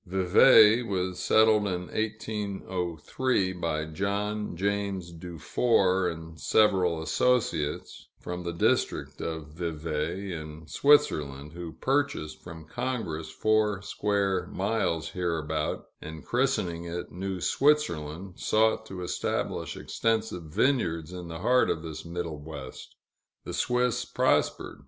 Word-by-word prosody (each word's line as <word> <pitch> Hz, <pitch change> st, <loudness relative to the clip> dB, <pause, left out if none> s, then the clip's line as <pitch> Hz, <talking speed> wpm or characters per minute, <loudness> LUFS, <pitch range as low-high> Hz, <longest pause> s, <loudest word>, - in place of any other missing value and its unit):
Vevay 105 Hz, +5 st, +6 dB
was 95 Hz, -5 st, -2 dB
settled 110 Hz, -1 st, +4 dB
in 90 Hz, -2 st, -2 dB
1803, 100 Hz, -1 st, -2 dB
by 85 Hz, -4 st, -2 dB
John 100 Hz, +4 st, -2 dB
James 100 Hz, -2 st, -1 dB
Dufour 90 Hz, -, +1 dB
and 80 Hz, -1 st, -8 dB
several 90 Hz, -6 st, +3 dB
associates, 85 Hz, -8 st, 0 dB
from 90 Hz, 0 st, -5 dB
the 85 Hz, -, -3 dB
District 85 Hz, -, 0 dB
of 80 Hz, -2 st, -4 dB
Vevay, 80 Hz, +3 st, -3 dB
in 80 Hz, -1 st, -7 dB
Switzerland, 75 Hz, -, +2 dB
who 85 Hz, -1 st, -7 dB
purchased 135 Hz, -, -1 dB
from 80 Hz, -2 st, -10 dB
Congress 110 Hz, -7 st, -3 dB
four 110 Hz, -2 st, +1 dB
square 100 Hz, -2 st, 0 dB
miles 95 Hz, -5 st, -1 dB
hereabout, 80 Hz, -4 st, -2 dB, 0.2 s
and, 80 Hz, 0 st, -8 dB
christening 120 Hz, -10 st, 0 dB
it 85 Hz, +1 st, -5 dB
New 95 Hz, +1 st, -4 dB
Switzerland, 95 Hz, -, +1 dB
sought 110 Hz, 0 st, +2 dB
to 95 Hz, -3 st, -6 dB
establish 90 Hz, +1 st, -2 dB
extensive 110 Hz, -6 st, -1 dB
vineyards 85 Hz, -, 0 dB
in 90 Hz, -1 st, -7 dB
the 80 Hz, +1 st, -7 dB
heart 125 Hz, +4 st, +4 dB
of 80 Hz, -, -1 dB
this 80 Hz, -1 st, -6 dB
middle 85 Hz, -2 st, -5 dB
West. 75 Hz, -3 st, -9 dB, 0.5 s
The -, -, -6 dB
Swiss 125 Hz, -1 st, +1 dB
prospered. -, -, 0 dB
90 Hz, 115 wpm, -28 LUFS, 80-105 Hz, 0.5 s, Vevay